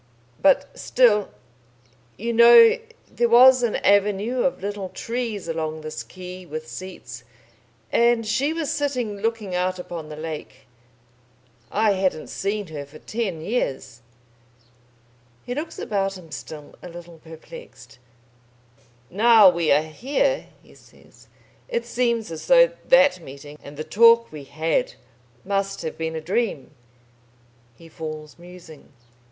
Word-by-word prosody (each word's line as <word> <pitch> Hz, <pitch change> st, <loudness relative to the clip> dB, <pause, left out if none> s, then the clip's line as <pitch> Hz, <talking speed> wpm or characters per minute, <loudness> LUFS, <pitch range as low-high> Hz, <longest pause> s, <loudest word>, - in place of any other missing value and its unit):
But 285 Hz, -2 st, +3 dB
still 220 Hz, -5 st, +3 dB, 0.9 s
You 235 Hz, +3 st, -3 dB
know, 445 Hz, -, +7 dB, 0.3 s
there 240 Hz, -1 st, 0 dB
was 255 Hz, +2 st, +7 dB
an 235 Hz, -3 st, 0 dB
avenue 205 Hz, +4 st, +2 dB
of 270 Hz, -, 0 dB
little 200 Hz, -2 st, -4 dB
trees 230 Hz, -5 st, -4 dB
along 160 Hz, -1 st, -3 dB
this 155 Hz, -6 st, -6 dB
quay 180 Hz, +9 st, -10 dB
with 155 Hz, -1 st, -7 dB
seats, 130 Hz, -12 st, -9 dB, 0.7 s
and 235 Hz, -1 st, +3 dB
she 260 Hz, +8 st, 0 dB
was 325 Hz, -2 st, -2 dB
sitting 250 Hz, -8 st, -2 dB
looking 220 Hz, -2 st, -3 dB
out 185 Hz, +1 st, -1 dB
upon 170 Hz, -3 st, -7 dB
the 155 Hz, -, -7 dB
lake.... 155 Hz, 0 st, -8 dB, 1.1 s
I 215 Hz, 0 st, +2 dB
hadn't 185 Hz, -5 st, -1 dB
seen 205 Hz, +1 st, -3 dB
her 150 Hz, -2 st, -6 dB
for 140 Hz, +2 st, -14 dB
ten 195 Hz, -4 st, -4 dB
years." 130 Hz, -, -3 dB, 1.4 s
He 245 Hz, -, -4 dB
looks 300 Hz, +5 st, -5 dB
about 195 Hz, -3 st, -2 dB
him 165 Hz, -4 st, -15 dB
still 145 Hz, +4 st, -9 dB
a 180 Hz, -, -9 dB
little 170 Hz, -1 st, -12 dB
perplexed. 165 Hz, -, -13 dB, 1.1 s
"Now 215 Hz, -1 st, +6 dB
we 170 Hz, -2 st, 0 dB
are 150 Hz, +2 st, +4 dB
here," 285 Hz, -, -1 dB, 0.2 s
he -, -, -20 dB
says, -, -, -21 dB, 0.4 s
"it 475 Hz, -1 st, -2 dB
seems 235 Hz, -5 st, -1 dB
as 160 Hz, -, -7 dB
though -, -, +6 dB, 0.2 s
that 270 Hz, -5 st, +5 dB
meeting 145 Hz, 0 st, -11 dB
and 145 Hz, 0 st, -12 dB
the 155 Hz, -, -4 dB
talk 230 Hz, +5 st, +5 dB
we 150 Hz, -3 st, -9 dB
had 160 Hz, +4 st, -1 dB, 0.5 s
must 195 Hz, -1 st, -2 dB
have 160 Hz, -, -4 dB
been 160 Hz, 0 st, -3 dB
a 160 Hz, -, -4 dB
dream." 185 Hz, -, -2 dB, 1.0 s
He 165 Hz, -, -16 dB
falls 155 Hz, -1 st, -8 dB
musing. 175 Hz, -4 st, -14 dB
195 Hz, 135 wpm, -23 LUFS, 160-235 Hz, 1.4 s, know